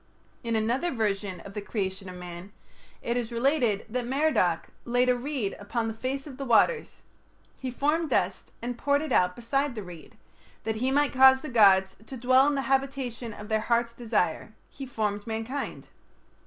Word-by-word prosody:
In 230 -1 -1
another 235 +10 +1
version 205 - -2
of 200 - -11
the 210 - -4
creation 190 -2 -4
of 180 - -8
man, 180 +2 -9 0.5
it 235 +1 -1
is 240 -1 -3
related 235 -4 +1
that 240 +2 -3
Merodach 255 - +1
"laid 245 +1 +2
a 250 - +4
reed 250 -5 -3
upon 225 +3 -2
the 225 - -3
face 260 +4 -3
of 275 -4 -9
the 275 - -4
waters; 270 - +2 0.6
he 260 - -4
formed 300 +6 0
dust, - - -1
and 240 0 -4
poured 285 +1 +2
it 310 - -5
out 180 0 +3
beside 275 +3 -1
the 215 - -5
reed.... 175 -3 -12 0.5
That 220 -1 -2
he 255 +4 0
might 290 +1 +2
cause 265 0 +7
the 305 - -6
gods 195 -5 +5
to 265 - -7
dwell 255 +3 +4
in 290 - +1
the 275 - -1
habitation 265 -4 -1
of 210 0 -9
their 220 0 +1
heart's 235 +1 +1
desire, 220 -6 -1 0.2
he 270 -1 -8
formed 210 -3 -2
mankind." 225 +5 -4
235 Hz, 180 wpm, -27 LUFS, 210-265 Hz, 0.6 s, cause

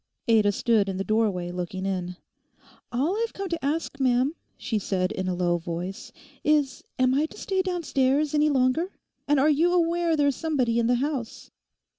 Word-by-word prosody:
Ada 215 -3 +4
stood 210 -1 +2
in 190 - -3
the 195 - -1
doorway 200 -5 0
looking 180 +1 -4
in. 180 -2 -3 0.8
'All 280 +10 0
I've 460 - -2
come 395 -1 -5
to 335 -3 -3
ask, 285 0 -2
ma'am,' 260 +2 +2 0.2
she 225 -1 -2
said 185 -1 -1
in 190 -4 -3
a 180 - -1
low 175 -1 +1
voice, 175 +3 -6 0.3
'is, 300 -3 +1
am 255 0 +3
I 295 +4 +2
to - - -14
stay 385 -1 -1
downstairs 305 -6 0
any 300 0 +3
longer? 275 +6 +1 0.4
And 290 -1 +3
are 280 - +4
you 330 +4 +3
aware 340 -1 +2
there's 285 -2 +2
somebody 255 -8 0
in 230 - +2
the 245 - +3
house? 265 -2 -3
255 Hz, 180 wpm, -26 LUFS, 195-305 Hz, 0.8 s, Ada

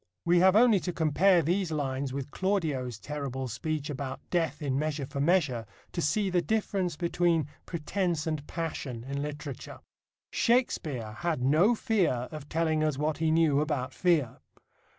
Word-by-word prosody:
We 175 +1 +4
have 190 +2 +5
only 225 -2 +6
to 180 - -3
compare 170 +3 +3
these 175 +2 0
lines 135 -3 -2
with 140 +1 -5
Claudio's 155 - -1
terrible 135 +2 -4
speech 150 +5 -3
about 135 -2 -4
death 170 -3 0
in 135 -3 -1
Measure 150 -2 -2
for 140 +1 -4
Measure 145 -8 +2 0.2
to 170 - -2
see 190 +6 +1
the 180 -1 +3
difference 190 -2 -1
between 170 -1 +1 0.2
pretence 170 -1 -1
and 155 -3 -3
passion 145 -8 -4
in 140 +2 -4
literature. 145 -2 -6 0.5
Shakespeare 155 - +1
had 170 -7 -1
no 165 - +4
fear 175 - +1
of 150 -2 -8
telling 160 -1 +1
us 155 -3 0
what 150 +1 -1
he 160 -1 +2
knew 160 -3 +3
about 140 -4 -2
fear. 155 -5 +1
155 Hz, 155 wpm, -29 LUFS, 140-175 Hz, 0.5 s, only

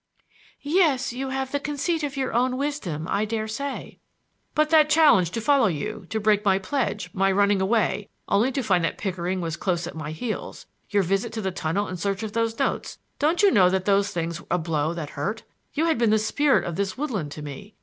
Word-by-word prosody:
"Yes; 290 -6 +2
you 265 +2 -4
have 265 0 -3
the 285 - 0
conceit 300 +3 -1
of 290 -1 -3
your 265 -1 -1
own 255 +2 +1
wisdom, 215 - -3
I 200 - 0
dare 220 0 -2
say." 275 +6 -5 0.6
"But 305 +1 +2
that 310 -1 +6
challenge 295 - +5
to 230 +6 -4
follow 275 -1 +4
you, 195 +4 -4
to 220 - -1
break 210 -1 +2
my 195 -2 +4
pledge; 205 -3 -2
my 195 +1 +2
running 200 0 +3
away, 205 0 +1 0.2
only 220 +6 +2
to 270 - -1
find 185 -5 +2
that 165 - -1
Pickering 185 -1 -2
was 165 -2 -3
close 175 -1 -1
at 175 - -6
my 155 -2 -6
heels; 215 +8 -5 0.2
your 205 -2 +2
visit 195 +5 0
to 220 - -3
the 190 -2 -1
tunnel 185 +4 -1
in 185 - -5
search 195 +4 -2
of 215 -1 -5
those 230 0 0
notes,—don't 320 +7 -1
you 400 - +7
know 185 -6 +5
that 190 0 0
those 200 0 +3
things 170 0 -3
were - - -19
a - - +2
blow 155 -2 -1
that 155 -4 -5
hurt? 210 +10 -3 0.3
You 315 - +2
had 325 -7 +1
been 235 -2 +3
the 215 - +4
spirit 275 +6 +2
of 170 -2 -4
this 195 +1 -2
woodland 215 - -3
to 150 - -8
me. 175 +9 -9
210 Hz, 220 wpm, -25 LUFS, 185-265 Hz, 0.6 s, you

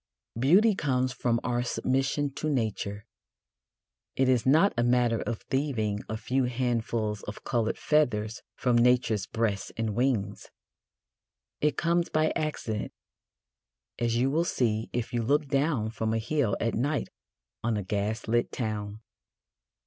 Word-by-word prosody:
Beauty 190 - +5
comes 130 -7 0
from 120 -1 0
our 120 -1 0
submission 135 +3 0
to 155 - -2
Nature; 105 -5 -2 1.1
it 135 - +2
is 130 -1 +2
not 160 +9 +5
a 120 - +1
matter 120 -1 +2
of 115 -3 -4
thieving 120 -7 -1
a 110 - -2
few 130 +3 0
handfuls 115 -4 -1
of 105 - -7
coloured 115 -2 0
feathers 115 -7 +1
from 125 -2 +1
Nature's 120 -4 +3
breast 105 -4 -1
and 110 -2 -1
wings. 110 -5 -1 1.1
It 150 -2 +1
comes 170 0 +1
by 155 0 +2
accident, 115 -9 -2 1.1
as 115 -1 +1
you 130 +3 +2
will 160 +4 +2
see 115 -9 0
if 120 -1 -3
you 120 - +1
look 145 +6 +2
down 135 -6 +1
from 110 0 -1
a - - +2
hill 120 -1 0
at 115 -1 0
night 140 +5 -1 0.5
on 115 -1 +1
a 105 - -2
gas 105 +4 -2
lit 120 +1 +1
town. 105 -2 -4
120 Hz, 140 wpm, -28 LUFS, 110-135 Hz, 1.1 s, Beauty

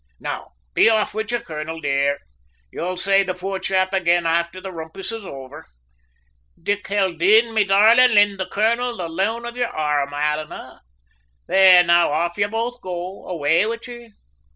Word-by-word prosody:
Now, - - -6 0.2
be - - +5
off 220 -2 +1
wid 220 +1 -4
ye, 240 - +1
colonel, 160 -7 -7
dear; 140 -1 0 0.5
you'll 180 +2 -4
say 195 +2 +3
the 185 -2 -3
poor 190 +1 -4
chap 190 0 0
ag'in 175 -2 +1
afther 170 +2 -1
the 190 0 -8
rumpus 165 +4 -7
is 225 -1 -7
over. 135 -4 -10 0.9
Dick 205 +4 -2
Haldane, 200 +3 +2
me 215 -1 +3
darlint, 220 +5 +5
hind 205 -1 +4
the 190 - -3
colonel 235 +3 0
the 175 - -4
loan 205 +8 -2
of 240 0 -6
yer 245 -1 -1
arrum, 150 -2 -1
alannah. 150 +1 -4 0.7
There, 185 -2 +6
now 170 -2 +3
off 170 +3 -1
ye 205 0 0
both 230 +3 -4
go. 180 +1 -7
Away 160 -1 +1
wid 230 0 -5
ye!" 240 -2 -11
190 Hz, 165 wpm, -21 LUFS, 165-220 Hz, 0.9 s, There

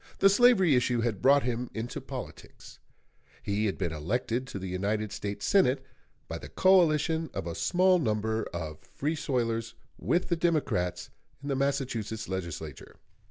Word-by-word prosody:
The 195 - +6
slavery 200 - +5
issue 125 -1 +2
had 115 -5 -1
brought 140 +1 +5
him 120 0 -2
into 115 +2 -4
politics; - - -9 0.6
he 105 +2 0
had 100 - -2
been 85 -4 -2
elected 120 - -2
to 105 - -6
the 95 - -6
United 100 +3 -2
States 100 -1 -4
Senate 135 -9 +3 0.4
by - - -5
the - - -10
coalition 165 -3 +3
of - - -3
a 85 - -4
small 185 - +3
number 110 -4 0
of 80 -2 -6
Free 150 +3 -3
soilers 115 -5 -2 0.2
with 175 - 0
the 170 - +2
Democrats 155 - 0 0.3
in 145 - -5
the 135 - +1
Massachusetts 130 -6 -2
Legislature. 85 -6 -6
120 Hz, 155 wpm, -29 LUFS, 100-150 Hz, 0.6 s, The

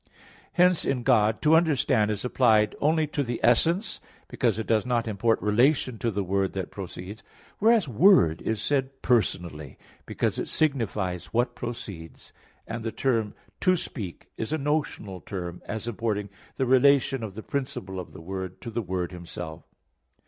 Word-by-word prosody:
Hence 180 -1 +4
in 125 -3 -1
God, 110 -4 +3
"to 155 +1 +5
understand" 140 -9 +3
is 105 +2 -2
applied 110 -4 +3
only 155 +2 +3
to 145 -1 -2
the 120 -3 -3
essence; 170 - +3 0.3
because 115 -5 0
it 110 - -3
does 110 -2 +2
not 120 -2 0
import 110 +2 +1
relation 120 +3 +2
to 115 - 0
the 100 -2 -1
Word 95 +1 0
that 95 -2 -4
proceeds; 95 +2 -8 0.4
whereas 220 -4 +4
"Word" 125 - +5
is 110 -1 -1
said 135 +2 -1
personally, 85 - 0 0.3
because - - -1
it - - -3
signifies 105 - -1
what 120 +1 0
proceeds; 100 -9 -8 0.3
and 110 0 -5
the 115 - -2
term 115 -6 0 0.2
"to 185 -1 +3
speak" 105 - -6
is 110 - -3
a 155 - +1
notional 140 -10 -2
term 90 -3 -6
as 110 +2 -4
importing 105 -3 -2 0.3
the 135 - 0
relation 135 +1 +4
of 105 -4 -6
the 110 - -7
principle 95 -9 -4
of 90 - -8
the - - -11
Word 95 +1 -6
to 115 - -6
the 120 +2 -2
Word 90 -3 -3
Himself. 85 -2 -7
115 Hz, 165 wpm, -26 LUFS, 95-135 Hz, 0.4 s, to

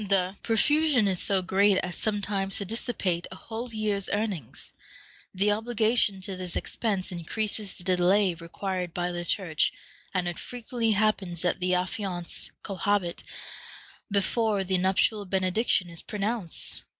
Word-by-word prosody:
The 190 -1 +2
profusion 275 +1 +3
is 185 -2 0
so 195 -2 +2
great 195 +2 +4
as 180 -1 -4
sometimes 200 -2 -1
to 200 - -2
dissipate 195 -5 -1
a - - -7
whole 230 +5 -6
year's 210 -3 -1
earnings. 200 - -3 0.6
The 200 +2 +2
obligation 220 -2 +2
to 190 0 -4
this 180 -1 -5
expense 200 -4 -1
increases 205 +4 -3
the - - -7
delay 185 +1 +3
required 175 +1 -4
by 175 0 -1
the 175 0 -3
Church, 170 -4 +2 0.4
and 180 -2 0
it 175 - -3
frequently 235 -2 -1
happens 195 -5 +1
that 180 - +1
the 180 0 +2
affianced 180 -1 -3
cohabit 195 -2 -1 0.9
before 205 0 +1
the 185 -1 +1
nuptial 195 +3 +2
benediction 190 +1 +2
is 170 -1 -2
pronounced. 210 -3 -2
195 Hz, 140 wpm, -28 LUFS, 180-215 Hz, 0.9 s, great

